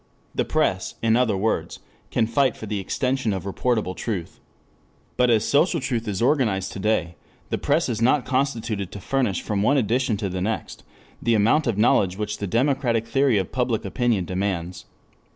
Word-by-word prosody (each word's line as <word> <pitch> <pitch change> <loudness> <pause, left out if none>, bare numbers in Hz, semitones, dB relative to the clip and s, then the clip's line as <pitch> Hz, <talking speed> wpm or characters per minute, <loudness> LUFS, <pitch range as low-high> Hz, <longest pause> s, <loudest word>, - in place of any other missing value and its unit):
The - - 0
press, - - 0
in 115 0 +4
other 115 -5 +2
words, 110 +4 -1 0.3
can 110 - +1
fight 130 +3 +1
for - - -7
the 105 -1 -3
extension 125 +3 -1
of 95 - -4
reportable 100 -1 -1
truth. 95 -8 -4 0.8
But 125 0 +3
as 110 -3 +3
social 165 +4 +3
truth 120 -6 -2
is 100 +1 -1
organized 110 -9 +1
to - - -7
day, 95 -5 0 0.3
the - - 0
press 155 +4 +1
is 115 -3 -2
not 130 +3 +3
constituted 115 -8 -1
to 100 - -6
furnish 120 -2 -1
from 105 -2 -1
one 140 +8 +3
edition 120 -1 +1
to 100 -1 -2
the 90 0 -4
next 110 +4 -3 0.4
the 115 -1 +2
amount 115 +8 +3
of 115 -4 0
knowledge 100 -4 +3
which 105 0 -3
the 100 - -3
democratic 120 0 +1
theory 135 -1 +2
of 95 -3 -2
public 125 -4 -1
opinion 110 -2 0
demands. 90 -2 -3
110 Hz, 180 wpm, -23 LUFS, 100-125 Hz, 0.8 s, in